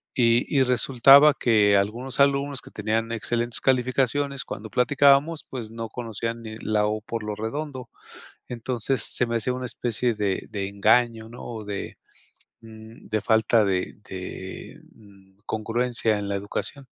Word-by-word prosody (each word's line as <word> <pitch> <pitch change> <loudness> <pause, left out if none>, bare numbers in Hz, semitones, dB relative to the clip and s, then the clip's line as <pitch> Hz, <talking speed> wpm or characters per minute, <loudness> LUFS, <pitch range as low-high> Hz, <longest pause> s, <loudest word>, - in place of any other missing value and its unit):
y 120 -1 +3
y 140 -3 +3
resultaba 135 +3 +6
que 105 -4 +3
algunos 120 +7 -2
alumnos 140 -1 +2
que - - -15
tenían 110 +2 -2
excelentes 120 +1 0
calificaciones, 135 +2 0
cuando 110 +1 -7
platicábamos, 140 +5 +3
pues, 120 -5 -6
no 115 0 -6
conocían 115 0 -5
ni 110 0 -8
la 105 -1 0
o 110 0 -2
por 115 +1 -5
lo 105 -1 -4
redondo, 130 +3 -5 0.6
entonces 125 +2 0
se - - +2
me 115 - -2
hacía 125 +3 -1
una 130 0 -5
especie 120 -1 -1
de 100 -2 -2
de 100 -2 -3
engaño 110 +3 +2
¿no?, 120 - -11
o 110 -3 -7
de, 100 -1 -6 0.7
mm, 110 +1 -14
de 110 0 -1
falta 110 +1 +3
de 95 -2 -1
de, 95 -1 -8
mm, 100 -2 -21
congruencia 115 0 0
en 100 - -5
la 100 - -2
educación. 105 +7 -5
115 Hz, 150 wpm, -24 LUFS, 105-125 Hz, 0.7 s, resultaba